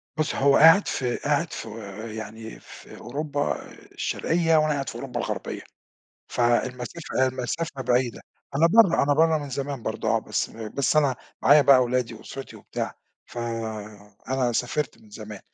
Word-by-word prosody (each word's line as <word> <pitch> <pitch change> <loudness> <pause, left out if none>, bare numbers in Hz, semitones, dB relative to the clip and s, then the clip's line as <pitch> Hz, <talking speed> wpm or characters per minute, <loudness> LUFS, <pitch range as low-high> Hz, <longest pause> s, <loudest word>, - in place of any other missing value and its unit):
بُصّي 155 0 -1
هو 140 0 +5
قاعد 165 +6 +7
في 125 -2 -1
قاعد 150 +3 0
في، 110 - -6 0.5
يعني 110 +1 -8
في - - -13
أوروبا 145 +4 -3
الشرقية 165 -1 -1
وأنا 155 0 +3
قاعد 135 -1 -3
في - - -9
أوروبا 125 -3 -5
الغربية، - - -4 0.7
فالمسافة 125 +4 0
المسافة 130 +3 -3
بعيدة، 125 -1 0 0.3
أنا 165 +4 +5
برَّه 195 -5 +5
أنا 145 0 +3
برَّه 160 +1 +4
من 145 -2 -6
زمان 135 -1 -4
برضه - - -2
آه، - - +3
بس - - -2
بس 115 +7 -2
أنا 140 -4 +3 0.3
معايا 145 +1 +7
بقى 135 -2 +6
ولادي 125 -1 -1
وأُسرتي 135 +4 -9
وبتاع، - - -5 0.3
فأنا 115 +1 -4
سافرت 125 +4 -2
من 105 - -19
زمان 105 -1 -9
130 Hz, 145 wpm, -25 LUFS, 120-150 Hz, 0.7 s, قاعد